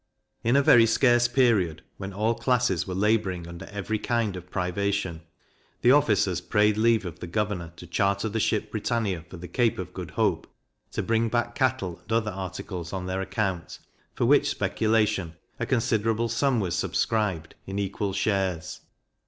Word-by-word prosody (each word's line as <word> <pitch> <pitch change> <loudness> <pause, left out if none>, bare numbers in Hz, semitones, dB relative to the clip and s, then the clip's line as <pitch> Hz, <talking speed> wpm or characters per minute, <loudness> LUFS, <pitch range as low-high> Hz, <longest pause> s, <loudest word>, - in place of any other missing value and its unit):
In 120 +3 +3
a 140 - +5
very 115 -4 +7
scarce 120 +1 +4
period, 115 - +2
when 95 0 -6
all 105 +4 +1
classes 125 -9 +1
were 90 - -4
labouring 95 -4 +1
under 85 0 -9
every 105 +1 -3
kind 115 -3 0
of 90 0 -9
privation, 95 -1 -1 0.6
the 120 - +6
officers 105 - +3
prayed 105 +2 +2
leave 115 -1 +3
of 85 - -7
the 90 - -6
governor 95 -3 -2
to 90 - -11
charter 100 +4 0
the 110 +1 -2
ship 105 0 0
Britannia 110 -6 -1
for 90 - -9
the 90 +1 -8
Cape 115 +5 +1
of - - -6
Good - - -6
Hope, - - 0 0.5
to - - -1
bring 115 0 +1
back 120 +1 0
cattle 125 -10 -1
and - - -13
other 110 -2 +1
articles 95 -2 -6
on 95 -1 -3
their 95 +1 -2
account, 95 -4 -3 0.4
for - - +1
which - - +4
speculation 105 -6 0 0.2
a - - -2
considerable 115 -2 +1
sum 125 +2 +1
was 90 -5 -1
subscribed, 95 -3 -1
in 95 +1 -4
equal 100 0 -2
shares. 95 -4 -1
105 Hz, 170 wpm, -26 LUFS, 90-115 Hz, 0.6 s, very